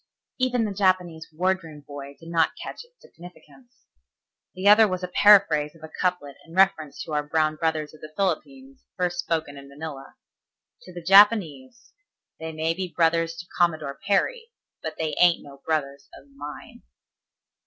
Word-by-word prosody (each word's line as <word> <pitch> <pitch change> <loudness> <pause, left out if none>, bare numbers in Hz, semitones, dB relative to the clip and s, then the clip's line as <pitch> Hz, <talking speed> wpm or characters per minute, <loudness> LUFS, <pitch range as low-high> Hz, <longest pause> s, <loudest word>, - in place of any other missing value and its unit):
Even 250 -2 +1
the 205 - -3
Japanese 185 -4 0
wardroom 165 -2 -2
boy 140 0 -10
did 165 - -12
not 165 -1 +2
catch - - -8
its 485 +1 -28
significance. 210 +8 -17 0.7
The 185 +2 -2
other 215 +1 +8
was 185 -1 -4
a - - -2
paraphrase 180 -6 +4
of 160 - -18
a 160 - -10
couplet 180 -7 -1
in 165 - -15
reference 190 -6 +2
to 160 - -8
our 150 - +1
brown 155 +1 0
brothers 160 -1 -2
of 155 - -16
the 155 - -10
Philippines 265 - -3
first 175 -1 -1
spoken 160 -4 -2
in 140 0 -12
Manila. 140 -1 -9 0.7
"To 180 - -12
the 175 -1 -9
Japanese: 195 - +4 0.5
'They 160 0 -5
may 160 +1 -1
be 185 +2 -4
brothers 165 -1 +1
to 175 +1 -9
Commodore 155 -5 0
Perry, 460 - 0 0.3
but 160 -1 -5
they 160 -2 -2
ain't 175 -1 +4
no 140 -1 -14
brothers 140 -3 -2
of - - -15
mine.'" 145 +1 -10
165 Hz, 165 wpm, -24 LUFS, 155-190 Hz, 0.7 s, other